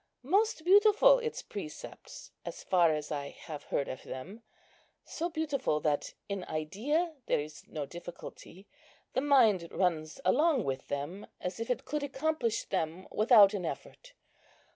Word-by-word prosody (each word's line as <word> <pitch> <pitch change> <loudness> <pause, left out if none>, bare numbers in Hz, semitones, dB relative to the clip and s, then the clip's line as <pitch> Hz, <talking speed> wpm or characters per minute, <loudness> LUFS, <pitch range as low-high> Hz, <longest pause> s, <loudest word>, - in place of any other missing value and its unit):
Most 390 - +2
beautiful 425 +6 +6
its 465 -2 -4
precepts, 360 -7 -9
as - - -7
far 175 -3 +4
as 150 0 -3
I 140 -1 -3
have 150 -3 -9
heard 140 - -1
of 130 - -6
them; 185 - -8 0.6
so 340 +2 -3
beautiful, 290 - -1
that 150 -1 -1
in 200 -2 -3
idea 240 - -1
there - - +2
is 150 +1 -8
no 150 -3 -4
difficulty. 175 +3 -10 0.5
The 260 - +1
mind 230 -11 +4
runs 165 -2 -1
along 300 -4 +3
with 135 -3 -3
them, 145 +8 -4
as 180 +2 -4
if 230 - -4
it 250 - -1
could 300 0 -2
accomplish 280 -4 -1
them 175 0 -3
without 215 -2 +6
an 195 -3 -2
effort. - - -7
205 Hz, 145 wpm, -31 LUFS, -, 0.6 s, beautiful